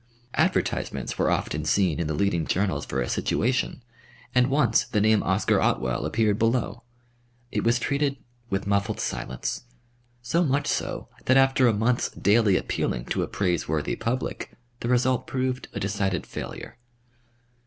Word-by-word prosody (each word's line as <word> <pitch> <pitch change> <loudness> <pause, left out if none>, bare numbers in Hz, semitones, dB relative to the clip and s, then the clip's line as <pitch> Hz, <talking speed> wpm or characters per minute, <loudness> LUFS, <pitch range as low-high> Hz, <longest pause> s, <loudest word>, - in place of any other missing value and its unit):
Advertisements - - 0
were - - +3
often 75 +1 -1
seen 85 0 +2
in 85 - -1
the 80 - -1
leading 85 -2 0
journals 95 +1 0
for 65 - -1
a - - -1
situation, 125 +1 0 0.5
and 125 0 +4
once 135 -5 +3
the 105 - 0
name 110 0 +4
"Oscar 95 +3 +2
Otwell" 65 +1 0
appeared 105 -2 +1
below. 115 +2 0 0.7
It - - -1
was 115 +1 +3
treated 140 +3 0 0.3
with 95 -1 -1
muffled 100 +1 0
silence, 65 - -3 0.6
so 165 +9 +2
much 145 -1 +1
so - - -2 0.2
that 130 - +5
after 135 -1 +5
a - - +5
month's 115 +4 +1
daily 105 -1 +3
appealing - - -2
to - - 0
a - - -1
praiseworthy 80 -5 -1
public, 125 +3 -3 0.3
the 120 - -3
result 125 0 +2
proved 130 0 -2
a - - -5
decided 95 -2 -1
failure. - - -7
110 Hz, 150 wpm, -26 LUFS, 95-125 Hz, 0.7 s, that